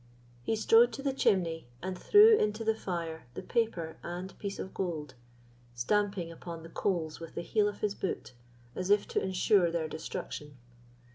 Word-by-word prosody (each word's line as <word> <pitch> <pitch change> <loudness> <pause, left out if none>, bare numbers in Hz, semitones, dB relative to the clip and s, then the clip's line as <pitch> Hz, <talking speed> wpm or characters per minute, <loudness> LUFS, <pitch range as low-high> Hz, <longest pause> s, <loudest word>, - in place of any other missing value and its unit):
He 220 - 0
strode 455 - +5
to 275 - -6
the 275 -2 0
chimney, 170 - +1 0.2
and 185 0 -3
threw 425 - +7
into 215 - 0
the 220 0 +2
fire 170 - -5
the - - -5
paper 180 -9 -1
and 180 +2 -6
piece 200 -1 -4
of 190 - -6
gold, 155 -7 -3 0.6
stamping 195 +6 0
upon 165 0 -8
the 165 - -10
coals 165 -3 -1
with 165 -1 -9
the 170 - -3
heel 210 +3 +2
of 205 -1 -5
his 205 -1 +1
boot, 190 -9 -4 0.4
as 185 +1 -3
if 205 0 +4
to - - 0
ensure 190 -1 +3
their 165 -1 -1
destruction. 150 -2 -6
185 Hz, 170 wpm, -31 LUFS, 165-210 Hz, 0.6 s, threw